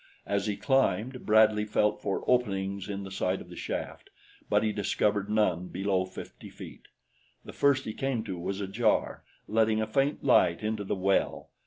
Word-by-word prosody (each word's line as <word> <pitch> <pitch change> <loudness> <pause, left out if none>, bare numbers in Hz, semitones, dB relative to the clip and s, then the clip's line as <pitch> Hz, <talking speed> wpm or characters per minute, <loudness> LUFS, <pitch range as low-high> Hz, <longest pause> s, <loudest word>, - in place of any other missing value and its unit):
As 100 +1 -1
he 105 -1 -1
climbed, 130 -2 0
Bradley 110 0 +5
felt 105 0 +1
for 100 -2 -2
openings 100 -5 0
in 100 -1 -4
the 95 - -8
sides 95 0 -1
of - - -18
the - - -10
shaft; - - -5 0.4
but 105 +1 +3
he 110 - +1
discovered 105 0 0
none 95 -5 +1
below 95 -1 0
fifty 95 - -10
feet. - - -12 0.6
The - - -9
first 140 -2 +2
he 110 - -4
came 135 -3 -2
to 95 -5 -5
was 95 +3 -3
ajar, 105 +3 0 0.2
letting 110 0 +2
a 110 - +1
faint 135 +7 0
light 90 -9 +4
into 110 -1 -2
the 100 - -2
well. 95 +1 0
105 Hz, 175 wpm, -29 LUFS, 95-110 Hz, 0.6 s, Bradley